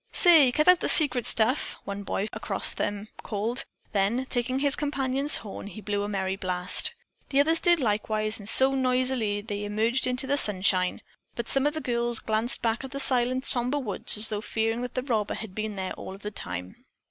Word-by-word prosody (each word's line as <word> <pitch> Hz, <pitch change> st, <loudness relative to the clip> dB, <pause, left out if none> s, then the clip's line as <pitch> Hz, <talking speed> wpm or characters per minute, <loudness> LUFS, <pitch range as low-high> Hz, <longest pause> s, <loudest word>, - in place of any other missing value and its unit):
"Say, 320 Hz, -8 st, +5 dB
cut 305 Hz, +5 st, 0 dB
out 360 Hz, -1 st, +6 dB
the -, -, -1 dB
secret 280 Hz, -7 st, +5 dB
stuff," 235 Hz, +5 st, +2 dB
one 200 Hz, 0 st, -6 dB
boy 200 Hz, +1 st, -3 dB
across -, -, -1 dB
from -, -, -3 dB
them 205 Hz, +1 st, -4 dB
called; 220 Hz, +5 st, -3 dB, 0.3 s
then, 210 Hz, +6 st, -1 dB
taking 250 Hz, +1 st, -2 dB
his 280 Hz, 0 st, +1 dB
companion's 275 Hz, 0 st, 0 dB
horn, 200 Hz, 0 st, -8 dB
he 210 Hz, -, -9 dB
blew 205 Hz, 0 st, -3 dB
a 205 Hz, -, -4 dB
merry 190 Hz, -2 st, -3 dB
blast. 180 Hz, -1 st, -1 dB, 0.3 s
The 275 Hz, -, +1 dB
others 320 Hz, +3 st, +2 dB
did 345 Hz, -2 st, +3 dB
likewise 215 Hz, -2 st, -1 dB
and 205 Hz, 0 st, +1 dB
so 265 Hz, +3 st, +8 dB
noisily 255 Hz, -5 st, 0 dB
they 205 Hz, -1 st, -6 dB
emerged 220 Hz, +5 st, 0 dB
into 250 Hz, +2 st, -1 dB
the 280 Hz, +1 st, 0 dB
sunshine, 185 Hz, -5 st, 0 dB, 0.3 s
but 235 Hz, -, -5 dB
some 270 Hz, +1 st, +1 dB
of 295 Hz, -, -2 dB
the 315 Hz, -, -4 dB
girls 240 Hz, -2 st, 0 dB
glanced 220 Hz, +3 st, -1 dB
back 230 Hz, +2 st, -1 dB
at 265 Hz, -, -7 dB
the 275 Hz, +1 st, -7 dB
silent, 255 Hz, 0 st, -1 dB
somber 250 Hz, +3 st, +3 dB
woods 220 Hz, -6 st, +3 dB
as 215 Hz, +2 st, +6 dB
though 210 Hz, -1 st, -4 dB
fearing 225 Hz, +1 st, -2 dB
that 250 Hz, -1 st, -7 dB
the 255 Hz, -, -2 dB
robber 220 Hz, -6 st, -2 dB
had 220 Hz, -4 st, -8 dB
been 215 Hz, 0 st, -5 dB
there 190 Hz, -1 st, -5 dB
all 190 Hz, -, -9 dB
of 195 Hz, -, -17 dB
the 210 Hz, -, -5 dB
time. 90 Hz, -, -7 dB
230 Hz, 205 wpm, -25 LUFS, 205-265 Hz, 0.3 s, so